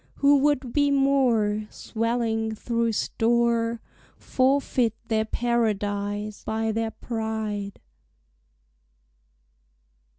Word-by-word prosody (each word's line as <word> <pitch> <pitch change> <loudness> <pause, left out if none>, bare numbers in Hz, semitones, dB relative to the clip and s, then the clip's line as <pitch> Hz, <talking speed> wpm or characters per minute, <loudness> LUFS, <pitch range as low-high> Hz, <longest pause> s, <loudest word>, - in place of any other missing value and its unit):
Who 285 0 +4
would 270 -3 +1
be 285 -1 +3
more, 245 -7 +2
Swelling 225 -1 -2
through 230 0 -1
store, 235 +1 +1 0.4
Forfeit 255 -3 +1
their 220 -1 +1
paradise 210 -3 -1
by 220 0 -1
their 225 +1 -1
pride. 220 -3 -4
230 Hz, 75 wpm, -25 LUFS, 220-245 Hz, 0.4 s, Who